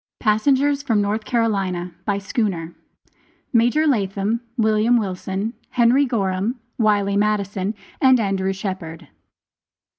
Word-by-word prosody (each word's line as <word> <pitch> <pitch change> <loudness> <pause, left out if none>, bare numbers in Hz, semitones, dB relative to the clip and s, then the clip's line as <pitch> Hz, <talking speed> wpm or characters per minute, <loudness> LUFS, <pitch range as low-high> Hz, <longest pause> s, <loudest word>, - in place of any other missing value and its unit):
PASSENGERS 275 +6 +2
FROM 230 -7 +1
NORTH 210 +2 -1
CAROLINA. 195 -7 -1
[BY 205 -2 0
SCHOONER.] 195 -6 -2 0.8
MAJOR 245 +7 +3
LATHAM, 210 -3 0 0.2
WILLIAM 220 +1 +3
WILSON, 195 +1 -3 0.2
HENRY 250 +3 +3
GORHAM, 200 -1 -1 0.2
WILEY 205 -2 +2
MADDISON, 205 -1 0 0.3
AND 260 -2 +6
ANDREW 195 -2 0
SHEPHERD. 185 -5 -6
210 Hz, 100 wpm, -21 LUFS, 195-235 Hz, 0.8 s, AND